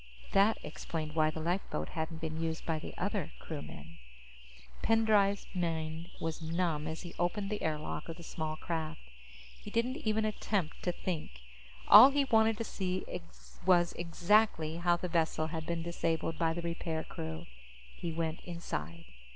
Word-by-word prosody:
_ - - -17
That 200 +3 +5
explained 155 0 -4
why 155 -1 +3
the 155 - -5
lifeboat 170 - -2
hadn't 160 0 -4
been 160 0 -3
used 160 0 -2
by 160 -2 0
the - - -8
other 190 -4 -2
crewmen. 85 - -8 0.8
Pendray's 210 -3 +3
mind 165 -1 -2
was 165 0 -3
numb 160 -2 0
as 160 +2 -4
he 175 - -8
opened 195 +3 0
the 210 - -2
air 155 -1 0
lock 155 - -5
of 165 - -5
the 170 - -10
small 155 -1 -3
craft. 160 -1 -3 0.6
He - - -8
didn't 235 +5 0
even 220 -6 +1
attempt 205 -5 -1
to 180 - 0
think. 155 - -4 0.5
All 220 +7 +12
he 280 0 +2
wanted 225 -3 +4
was 230 - -2
to - - -9
see 185 -1 -1 0.9
exactly 170 -1 +2
how 175 0 +3
the 180 - -3
vessel 165 -2 +1
had 160 -1 -4
been 170 -1 -1
disabled 165 -1 -1
by 165 -1 +2
the 170 +1 -4
repair 165 -1 -2
crew. 80 0 -6 0.5
He 170 - -4
went 160 0 -2
inside. 85 - -5
165 Hz, 165 wpm, -33 LUFS, 160-195 Hz, 0.9 s, All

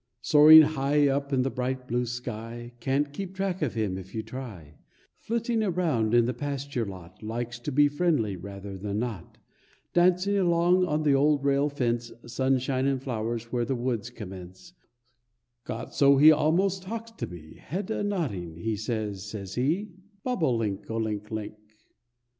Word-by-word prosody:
Soaring 155 +1 +9
high 145 0 +2
up 140 +1 -1
in 130 -2 +2
the 135 - -1
bright 130 0 -3
blue 125 0 -1
sky, 120 0 -6
Can't 140 +3 0
keep 190 +3 -6
track 190 -2 -2
of 140 -6 -1
him 100 -4 -1
if 95 +2 -11
you 110 - -2
try; 100 - -9 0.4
Flitting 230 0 -1
around 160 - +1
in 120 -1 +5
the 125 - -1
pasture 140 -5 -3
lot, 90 -2 -10
Likes 120 +2 -4
to 135 +5 -4
be 145 +2 +5
friendly, 145 - 0
rather 100 +1 -8
than 100 +1 -3
not; 110 -6 -5 0.6
Dancing 185 +3 +3
along 175 0 +3
on 155 0 0
the 145 -2 +4
old 145 +1 +3
rail 140 +1 +2
fence, 120 -4 -1
Sunshine 130 +2 0
and 135 -1 +1
flowers 115 -2 -4
where 120 -1 0
the 135 +2 -1
woods 120 -2 -2
commence; 95 - -10 0.9
Got - - -6
so 140 -1 +5
he 150 +3 +9
almost 175 +6 +2
talks 225 +4 -6
to 225 - -5
me; 80 -3 -11
Head 190 +6 -4
a - - -1
nodding, 125 - -2
he 110 +6 -2
says, 110 -2 -3
says 100 -2 -7
he 165 - 0 0.3
"Bob 250 -7 -2
o 130 -6 +3
link, 105 -4 -3
o 115 - -2
link, 105 -1 -3
o - - -2
link." 105 0 -6
130 Hz, 170 wpm, -27 LUFS, 110-155 Hz, 0.9 s, Soaring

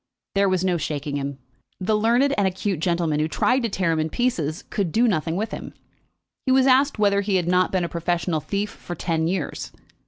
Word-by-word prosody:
There 200 0 +3
was 185 0 +1
no 180 -2 +2
shaking 145 -2 -3
him. 140 -1 -4 0.4
The 200 +3 +1
learned 240 +6 +3
and 200 -2 +2
acute 190 -1 -2
gentleman 170 -3 0
who 155 - +1
tried 250 +10 +1
to 230 - -1
tear 185 -4 0
him 160 - 0
in 155 +1 0
pieces 170 - -1
could 195 -5 -1
do 235 +6 +3
nothing 165 -5 0
with 215 +4 -2
him. - - -7 0.7
He - - +4
was 260 0 +5
asked 270 +1 +4
whether 200 -1 +3
he 200 -1 0
had 180 -2 +1
not 180 +1 +3
been 185 -2 +1
a - - 0
professional 170 -1 -1
thief 200 +6 -3
for 175 - -8
ten 160 -1 -1
years. 175 -4 -3
185 Hz, 215 wpm, -23 LUFS, 160-210 Hz, 0.7 s, was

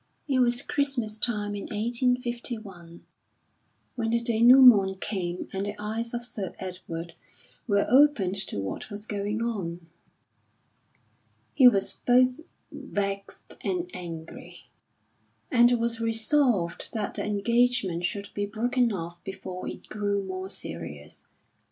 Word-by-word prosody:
It 270 -3 +2
was 245 +1 +2
Christmas 265 -7 -1
time 210 -3 -1
in 205 - -5
1851 235 -6 -2 0.9
when 230 -2 -1
the 235 +1 +2
dénoument 235 -4 +6
came 180 -4 -3
and 195 0 -2
the 205 - -4
eyes 225 +3 -3
of 240 0 -4
Sir 205 -6 -6
Edward 175 -2 -7 0.5
were 200 -2 +3
opened 250 -8 +4
to - - -5
what 95 - -5
was 205 0 -6
going 210 +1 -2
on. 180 -7 -4 1.7
He 260 -3 +7
was 200 -5 +3
both 250 +2 +4 0.3
vexed 200 -1 -5
and 360 -1 -2
angry, 165 -2 -9 0.8
and 240 -2 +6
was 230 -1 0
resolved 225 - +1
that 210 -2 -2
the - - -4
engagement 210 -4 +1
should 200 +3 -3
be 205 0 -2
broken 240 +3 +1
off 170 -3 -6
before 190 -1 -7
it - - -8
grew 205 -1 -1
more 185 0 -5
serious. 80 - -8
210 Hz, 120 wpm, -27 LUFS, 190-240 Hz, 1.7 s, He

